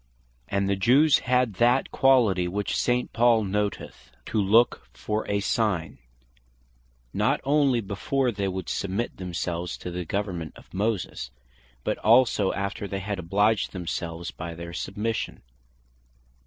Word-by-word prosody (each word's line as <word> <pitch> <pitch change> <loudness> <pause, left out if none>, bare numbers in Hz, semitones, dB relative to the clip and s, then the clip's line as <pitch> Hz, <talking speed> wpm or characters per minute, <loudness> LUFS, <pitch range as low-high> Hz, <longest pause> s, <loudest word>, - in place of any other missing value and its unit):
And 100 0 0
the 100 - +2
Jews 135 +10 +5
had 125 -3 +3
that 120 +3 +3
quality 115 -10 +3
which 100 +3 -2
St. 125 0 0
Paul 115 -1 +4
noteth, 100 -10 -3 0.2
"to 110 - 0
look 110 +5 +3
for 105 0 -3
a 100 0 +1
sign," 95 - -1 1.1
not - - +1
onely 140 -4 +3
before 120 +6 -1
they 100 -2 -2
would 95 0 -4
submit 100 +5 -2
themselves 90 -1 -3
to 90 - -6
the 90 +1 -3
government 90 -4 -3
of - - -17
Moses, 100 - -2 0.5
but - - -1
also 115 -3 +4
after 100 +1 -3
they 100 - -4
had 100 0 -4
obliged 105 +5 +1
themselves 85 -2 -4
by 85 +1 -7
their 85 +1 -8
submission. 105 +5 -3
100 Hz, 135 wpm, -26 LUFS, 90-115 Hz, 1.1 s, Jews